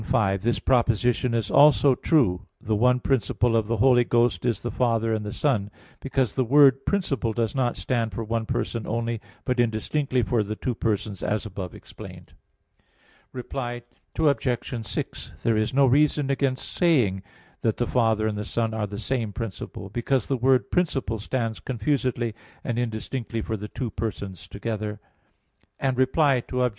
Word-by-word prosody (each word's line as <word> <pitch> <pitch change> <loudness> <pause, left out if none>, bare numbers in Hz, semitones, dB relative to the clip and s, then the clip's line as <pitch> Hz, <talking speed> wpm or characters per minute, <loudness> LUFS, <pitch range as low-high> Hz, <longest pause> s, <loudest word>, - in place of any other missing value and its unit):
5: 100 -2 +1
This 120 +3 +1
proposition 120 0 +2
is 115 -2 -1
also 140 -2 +6
true: 125 - +2 0.2
The 110 0 -1
one 125 +3 +3
principle 120 -2 +1
of 110 -2 +1
the 115 +1 0
Holy 120 +1 +5
Ghost 120 -4 +1
is 120 - -1
the 120 - -2
Father 115 -2 +1
and 110 -1 -1
the 105 - -5
Son; 110 -9 0 0.3
because 135 -4 -1
the 130 - +1
word 135 +1 +5
"principle" 140 - 0
does 115 -1 -1
not 125 -3 0
stand 115 +3 -1
for 115 +4 -4
one 115 0 -2
person 115 -3 -2
only, 115 0 -2 0.2
but 125 -2 0
indistinctly 120 +3 0
for 110 +2 +1
the 105 +1 -3
two 125 - -2
persons 105 -3 -2
as 105 +2 -1
above 95 -4 -6
explained. - - -12 1.0
Reply 120 -1 -5 0.3
Obj. 125 -6 0
6: - - -5
There 115 - +2
is 110 0 +1
no 140 +1 +4
reason 145 +1 +3
against 135 -1 -1
saying 125 - +2 0.4
that 110 -2 0
the 120 - +1
Father 115 -3 +2
and 105 -1 -1
the - - -2
Son 115 +1 -1
are 110 -2 -2
the 100 0 -7
same 115 -1 -2
principle, 100 -2 -6
because 120 +5 0
the 135 - +1
word 130 +1 +2
"principle" 140 -10 0
stands 115 0 -2
confusedly 125 -2 -1 0.3
and 120 -1 -2
indistinctly 115 0 -3
for 110 - -2
the 105 0 -6
two 120 +2 -4
Persons 100 -5 -5
together. 105 0 -4 0.8
Reply 130 0 +2
Obj. 125 -1 +2
120 Hz, 165 wpm, -25 LUFS, 110-130 Hz, 1.0 s, also